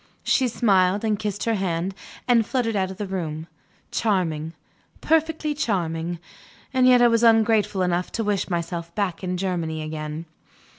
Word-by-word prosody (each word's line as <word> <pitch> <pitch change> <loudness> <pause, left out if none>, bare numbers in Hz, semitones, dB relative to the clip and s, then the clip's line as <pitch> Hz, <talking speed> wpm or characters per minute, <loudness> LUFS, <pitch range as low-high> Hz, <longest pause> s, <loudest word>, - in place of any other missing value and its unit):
She 260 - +2
smiled, 200 -4 +2
and 210 -2 0
kissed 205 -2 -3
her 230 - +1
hand, 185 -2 -1 0.3
and 240 -2 +5
fluttered 230 -1 -1
out 190 -2 0
of 190 - -8
the 205 - -3
room. 165 -5 -4 0.5
Charming; 165 -7 0 0.5
perfectly 320 -1 +1
charming. 175 - -2 0.6
And 255 -1 +4
yet 250 -1 +6
I - - +7
was 230 -1 +3
ungrateful 220 -4 +3
enough 180 0 -1
to 225 - -1
wish 205 -2 -1
myself 170 -1 -3
back 195 -4 -2
in 180 0 -2
Germany 170 -4 -2
again. 155 +1 -5
190 Hz, 155 wpm, -24 LUFS, 170-225 Hz, 0.6 s, I